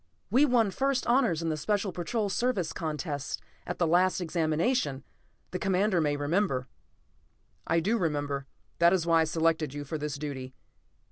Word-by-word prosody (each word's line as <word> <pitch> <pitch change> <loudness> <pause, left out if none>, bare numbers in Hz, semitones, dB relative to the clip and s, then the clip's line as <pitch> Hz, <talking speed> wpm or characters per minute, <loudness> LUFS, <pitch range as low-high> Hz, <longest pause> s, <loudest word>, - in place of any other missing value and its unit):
"We 265 +6 +5
won 235 -7 +3
first 270 +4 0
honors 235 - +2
in 165 - 0
the 155 - -1
Special 200 +5 0
Patrol 205 +5 -2
Service 200 -5 0
contests 150 -3 -3 0.3
at 175 - -3
the 175 - +2
last 180 +3 +3
Examination, 160 - 0 0.5
the 180 - -3
Commander 190 -1 +2
may 145 -2 +1
remember." 145 -3 0 1.0
"I 165 +1 +2
do 220 +7 +1
remember. 145 -4 -1 0.3
That 170 +1 +6
is 180 -3 +1
why 165 -1 +4
I - - +3
selected 160 -2 0
you 145 0 -5
for 155 +3 -4
this 150 -1 -3
duty." 135 -3 -6
165 Hz, 160 wpm, -29 LUFS, 150-195 Hz, 1.0 s, That